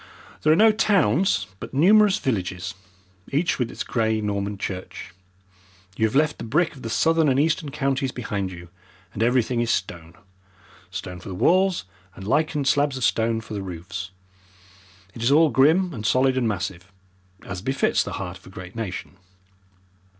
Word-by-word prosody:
There 155 Hz, -, +4 dB
are -, -, +6 dB
no 220 Hz, +5 st, +6 dB
towns, 195 Hz, -, +2 dB
but -, -, -8 dB
numerous 200 Hz, +6 st, +5 dB
villages, 95 Hz, -5 st, -2 dB, 0.6 s
each 150 Hz, +4 st, +1 dB
with 120 Hz, -2 st, 0 dB
its -, -, -5 dB
grey 110 Hz, -1 st, 0 dB
Norman 100 Hz, -1 st, -2 dB
church. 95 Hz, -2 st, -6 dB, 0.8 s
You 110 Hz, -, +2 dB
have 110 Hz, -, -6 dB
left 150 Hz, +1 st, +2 dB
the -, -, -5 dB
brick 160 Hz, +9 st, +1 dB
of 130 Hz, -, -12 dB
the 115 Hz, -, -5 dB
southern 160 Hz, +5 st, +3 dB
and 135 Hz, 0 st, +2 dB
eastern 155 Hz, 0 st, +1 dB
counties 135 Hz, -2 st, -1 dB
behind 100 Hz, -6 st, -3 dB
you, 85 Hz, -1 st, -10 dB, 0.4 s
and 105 Hz, -, -5 dB
everything 120 Hz, 0 st, +2 dB
is 120 Hz, -, -1 dB
stone 85 Hz, -5 st, -3 dB, 0.7 s
stone 90 Hz, -2 st, -6 dB
for 90 Hz, -, -10 dB
the 95 Hz, -, -5 dB
walls, 185 Hz, -, +2 dB, 0.3 s
and 95 Hz, -, -9 dB
lichened 150 Hz, +1 st, +1 dB
slabs 145 Hz, -1 st, +2 dB
of 130 Hz, -, -4 dB
stone 115 Hz, 0 st, +1 dB
for 115 Hz, -, -10 dB
the 100 Hz, -, -3 dB
roofs. 90 Hz, 0 st, -6 dB, 1.0 s
It 115 Hz, -, -9 dB
is 120 Hz, +4 st, +2 dB
all 155 Hz, +1 st, +5 dB
grim 165 Hz, +6 st, +3 dB
and 110 Hz, -5 st, -6 dB
solid 130 Hz, +4 st, +3 dB
and 125 Hz, -3 st, +1 dB
massive, 90 Hz, -2 st, -4 dB, 0.5 s
as 95 Hz, -2 st, -6 dB
befits 135 Hz, +6 st, +1 dB
the -, -, -6 dB
heart 90 Hz, -2 st, -5 dB
of -, -, -18 dB
a -, -, -10 dB
great 95 Hz, +1 st, -10 dB
nation. 100 Hz, -4 st, -5 dB
115 Hz, 170 wpm, -24 LUFS, 95-150 Hz, 1.0 s, are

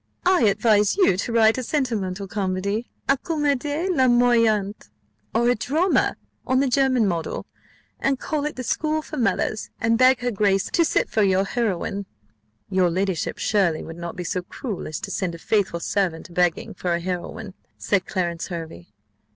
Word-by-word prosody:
I 365 Hz, -9 st, +4 dB
advise 210 Hz, -, +3 dB
you 375 Hz, -, +4 dB
to 200 Hz, +5 st, -3 dB
write 225 Hz, +1 st, +4 dB
a -, -, -3 dB
sentimental 210 Hz, -9 st, -2 dB
comedy, 200 Hz, +2 st, -2 dB, 0.2 s
a 275 Hz, -, +4 dB
comédie 295 Hz, +1 st, -1 dB
larmoyante, 235 Hz, -5 st, +3 dB, 0.4 s
or 235 Hz, +2 st, +2 dB
a 245 Hz, -, +5 dB
drama 310 Hz, -, +1 dB, 0.3 s
on 260 Hz, 0 st, +3 dB
the 275 Hz, -, +2 dB
German 255 Hz, -3 st, +3 dB
model, 170 Hz, -3 st, -3 dB, 0.5 s
and 270 Hz, 0 st, +1 dB
call 295 Hz, -1 st, -2 dB
it 300 Hz, -, -3 dB
The 255 Hz, -, -5 dB
School 310 Hz, +4 st, -1 dB
for 305 Hz, -, -7 dB
Mothers, 225 Hz, -3 st, 0 dB
and 230 Hz, +1 st, +2 dB
beg 255 Hz, 0 st, +5 dB
her 245 Hz, 0 st, 0 dB
grace 195 Hz, -2 st, +2 dB
of -, -, -7 dB
to 335 Hz, -, +3 dB
sit -, -, +1 dB
for 220 Hz, -, +2 dB
your 190 Hz, -1 st, +3 dB
heroine." 200 Hz, -3 st, -2 dB, 0.6 s
"Your 185 Hz, -2 st, +3 dB
ladyship, 185 Hz, 0 st, -1 dB
surely, 190 Hz, -7 st, +1 dB
would 165 Hz, -, -8 dB
not 170 Hz, 0 st, -6 dB
be 180 Hz, -, -5 dB
so 180 Hz, +2 st, -2 dB
cruel 205 Hz, +3 st, -6 dB
as 155 Hz, -, -4 dB
to -, -, -5 dB
send 180 Hz, -3 st, -2 dB
a -, -, -8 dB
faithful 190 Hz, -1 st, 0 dB
servant 180 Hz, -2 st, -1 dB
a -, -, -14 dB
begging 175 Hz, -2 st, 0 dB
for 175 Hz, -1 st, -1 dB
a -, -, -2 dB
heroine?" 180 Hz, +3 st, -5 dB, 0.2 s
said 195 Hz, -2 st, 0 dB
Clarence 175 Hz, -4 st, -2 dB
Hervey. 170 Hz, -1 st, -7 dB
210 Hz, 175 wpm, -23 LUFS, 185-255 Hz, 0.6 s, a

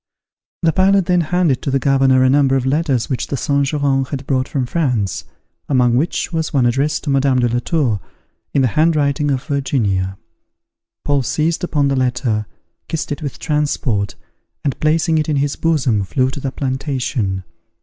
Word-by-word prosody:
The 165 Hz, -1 st, +3 dB
pilot 195 Hz, 0 st, +3 dB
then 180 Hz, 0 st, +2 dB
handed 165 Hz, -4 st, +1 dB
to -, -, -3 dB
the 135 Hz, -, +2 dB
governor 135 Hz, -1 st, +3 dB
a 130 Hz, -, +4 dB
number 135 Hz, -1 st, +3 dB
of 130 Hz, -1 st, 0 dB
letters 135 Hz, -3 st, +1 dB
which 130 Hz, -, -2 dB
the 140 Hz, -, -3 dB
Saint 140 Hz, +1 st, +1 dB
Geran 140 Hz, -2 st, +1 dB
had 135 Hz, 0 st, -6 dB
brought 130 Hz, -1 st, 0 dB
from 135 Hz, -3 st, -1 dB
France, 125 Hz, -, -1 dB, 0.4 s
among 125 Hz, -3 st, +3 dB
which 160 Hz, +6 st, -1 dB
was 160 Hz, -1 st, -1 dB
one 130 Hz, -4 st, +2 dB
addressed 135 Hz, +5 st, 0 dB
to 145 Hz, -, -1 dB
Madame 135 Hz, -1 st, +2 dB
de 120 Hz, -1 st, +3 dB
la 120 Hz, +1 st, 0 dB
Tour, 125 Hz, -, 0 dB, 0.5 s
in 140 Hz, -, +2 dB
the 125 Hz, -, +3 dB
hand 160 Hz, +7 st, +2 dB
writing 145 Hz, 0 st, +1 dB
of 135 Hz, -2 st, -1 dB
Virginia. 105 Hz, -10 st, -1 dB, 0.9 s
Paul 145 Hz, -1 st, +2 dB
seized 155 Hz, +7 st, -1 dB
upon 145 Hz, -5 st, +1 dB
the 140 Hz, -, +1 dB
letter, 125 Hz, -4 st, 0 dB, 0.4 s
kissed 160 Hz, -1 st, -3 dB
it 145 Hz, -, -3 dB
with 145 Hz, -4 st, -5 dB
transport, 145 Hz, -, -1 dB, 0.5 s
and 140 Hz, -3 st, -2 dB
placing 160 Hz, +1 st, +2 dB
it 155 Hz, -, -1 dB
in 150 Hz, -, +1 dB
his 140 Hz, 0 st, 0 dB
bosom, 140 Hz, -10 st, +1 dB
flew 130 Hz, +6 st, 0 dB
to 140 Hz, -, -6 dB
the 135 Hz, -1 st, -3 dB
plantation. 130 Hz, -8 st, -2 dB
140 Hz, 180 wpm, -18 LUFS, 130-150 Hz, 0.9 s, a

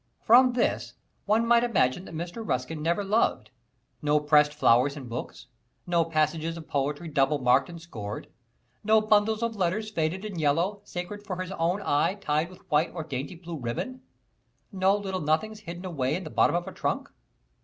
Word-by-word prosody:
From 250 Hz, +2 st, +6 dB
this 240 Hz, -, -1 dB, 0.3 s
one 220 Hz, +3 st, +3 dB
might 235 Hz, 0 st, +4 dB
imagine 185 Hz, -, +1 dB
that 165 Hz, -, -9 dB
Mr. 175 Hz, +7 st, -5 dB
Ruskin 150 Hz, -, -2 dB
never 170 Hz, +6 st, 0 dB
loved 195 Hz, -, +1 dB, 0.5 s
no 150 Hz, 0 st, +3 dB
pressed 150 Hz, 0 st, +4 dB
flowers 140 Hz, -1 st, +3 dB
in 135 Hz, -3 st, -8 dB
books; 120 Hz, 0 st, -6 dB, 0.4 s
no 170 Hz, -1 st, +2 dB
passages 160 Hz, +1 st, 0 dB
of 160 Hz, -, -10 dB
poetry 145 Hz, +4 st, -2 dB
double 145 Hz, 0 st, +2 dB
marked 130 Hz, +2 st, +3 dB
and 170 Hz, -1 st, -8 dB
scored; 105 Hz, -11 st, -7 dB, 0.6 s
no 220 Hz, +1 st, +5 dB
bundles 215 Hz, +1 st, +2 dB
of 230 Hz, -1 st, -1 dB
letters 205 Hz, +3 st, -1 dB
faded 175 Hz, +2 st, -1 dB
and 190 Hz, -6 st, -4 dB
yellow, 170 Hz, +8 st, +1 dB
sacred 195 Hz, +4 st, -6 dB
for 200 Hz, -3 st, -4 dB
his 185 Hz, 0 st, -4 dB
own 180 Hz, +3 st, -1 dB
eye, 145 Hz, +6 st, +2 dB
tied 160 Hz, -4 st, -1 dB
with 185 Hz, +1 st, -16 dB
white 150 Hz, +3 st, +3 dB
or 165 Hz, -, -3 dB
dainty 145 Hz, +3 st, -5 dB
blue 170 Hz, -1 st, -7 dB
ribbon; 130 Hz, -, -4 dB, 0.7 s
no 190 Hz, 0 st, +3 dB
little 190 Hz, -2 st, -3 dB
nothings 165 Hz, +9 st, 0 dB
hidden 175 Hz, -2 st, -8 dB
away 145 Hz, -6 st, -1 dB
in 185 Hz, -, -4 dB
the 155 Hz, -, -8 dB
bottom -, -, +3 dB
of 175 Hz, 0 st, -1 dB
a -, -, -5 dB
trunk. -, -, -2 dB
170 Hz, 180 wpm, -27 LUFS, 150-205 Hz, 0.7 s, From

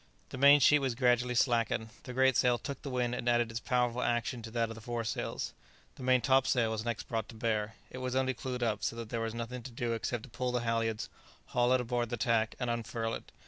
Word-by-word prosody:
The -, -, -7 dB
main 140 Hz, +1 st, +8 dB
sheet 150 Hz, +2 st, +6 dB
was 135 Hz, -4 st, -1 dB
gradually 125 Hz, 0 st, +2 dB
slackened, 115 Hz, -3 st, +1 dB, 0.2 s
the 130 Hz, -, -6 dB
great 130 Hz, 0 st, +4 dB
sail 125 Hz, -1 st, +4 dB
took 140 Hz, +3 st, -6 dB
the 140 Hz, -, -5 dB
wind 125 Hz, -2 st, 0 dB
and 120 Hz, 0 st, -1 dB
added 120 Hz, -1 st, +2 dB
its 115 Hz, -, -3 dB
powerful 125 Hz, 0 st, 0 dB
action 120 Hz, +1 st, 0 dB
to 110 Hz, -, -7 dB
that 115 Hz, 0 st, 0 dB
of -, -, -5 dB
the 115 Hz, -, -11 dB
fore 120 Hz, +1 st, -3 dB
sails. 110 Hz, -, -3 dB, 0.4 s
The -, -, -13 dB
main 130 Hz, 0 st, +3 dB
top 135 Hz, 0 st, +3 dB
sail 115 Hz, -3 st, +2 dB
was 110 Hz, -1 st, -2 dB
next 120 Hz, -1 st, -3 dB
brought 110 Hz, -2 st, -2 dB
to 115 Hz, -, -10 dB
bear; 110 Hz, -1 st, -1 dB, 0.2 s
it 130 Hz, -, -7 dB
was 130 Hz, 0 st, -3 dB
only 130 Hz, 0 st, +2 dB
clewed 125 Hz, 0 st, -4 dB
up, 110 Hz, -3 st, -1 dB
so -, -, -1 dB
that 115 Hz, -2 st, -6 dB
there 115 Hz, -1 st, -2 dB
was 115 Hz, 0 st, -3 dB
nothing 120 Hz, +2 st, -5 dB
to 120 Hz, -, -8 dB
do 120 Hz, 0 st, -2 dB
except 115 Hz, 0 st, -2 dB
to 135 Hz, -, -11 dB
pull 125 Hz, +2 st, -2 dB
the 125 Hz, -1 st, 0 dB
halyards, 115 Hz, -1 st, -1 dB, 0.4 s
haul 120 Hz, 0 st, +2 dB
it 130 Hz, -, +3 dB
aboard 120 Hz, -1 st, -1 dB
the 120 Hz, -, -2 dB
tack, 115 Hz, -2 st, +1 dB
and 125 Hz, -, -1 dB
unfurl 115 Hz, -1 st, -2 dB
it. -, -, -7 dB
120 Hz, 255 wpm, -32 LUFS, 115-125 Hz, 0.4 s, main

